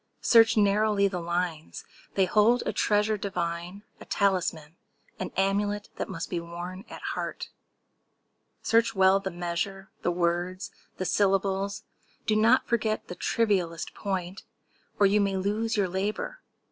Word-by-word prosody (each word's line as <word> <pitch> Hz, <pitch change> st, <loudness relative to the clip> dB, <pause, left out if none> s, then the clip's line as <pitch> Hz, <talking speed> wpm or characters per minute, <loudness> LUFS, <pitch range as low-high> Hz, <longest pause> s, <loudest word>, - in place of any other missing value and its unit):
Search 225 Hz, 0 st, +6 dB
narrowly 205 Hz, 0 st, +3 dB
the 185 Hz, -2 st, -3 dB
lines!—they 175 Hz, +2 st, -3 dB
hold 220 Hz, +5 st, +3 dB
a -, -, -1 dB
treasure 210 Hz, 0 st, +2 dB
Divine—a 180 Hz, +1 st, -5 dB
talisman—an 175 Hz, -5 st, -3 dB
amulet 205 Hz, +1 st, 0 dB
That -, -, -3 dB
must 170 Hz, -3 st, -4 dB
be 175 Hz, -, -2 dB
worn 175 Hz, +4 st, -7 dB
at -, -, -10 dB
heart. -, -, -5 dB, 1.1 s
Search 230 Hz, -1 st, +2 dB
well 190 Hz, 0 st, +5 dB
the 195 Hz, -1 st, -4 dB
measure— 175 Hz, +2 st, -4 dB
The -, -, 0 dB
words—the 175 Hz, +2 st, -3 dB
syllables! 195 Hz, +1 st, +1 dB, 0.4 s
Do 215 Hz, -, +2 dB
not 225 Hz, +4 st, +4 dB
forget 220 Hz, -2 st, -1 dB
The 180 Hz, -, -5 dB
trivialest 185 Hz, -8 st, 0 dB
point, 190 Hz, -2 st, -4 dB, 0.6 s
or 205 Hz, -, +5 dB
you 205 Hz, +1 st, +4 dB
may 195 Hz, -1 st, 0 dB
lose 215 Hz, +4 st, -1 dB
your 200 Hz, -2 st, +2 dB
labor! 205 Hz, -, -3 dB
195 Hz, 125 wpm, -27 LUFS, 180-210 Hz, 1.1 s, Search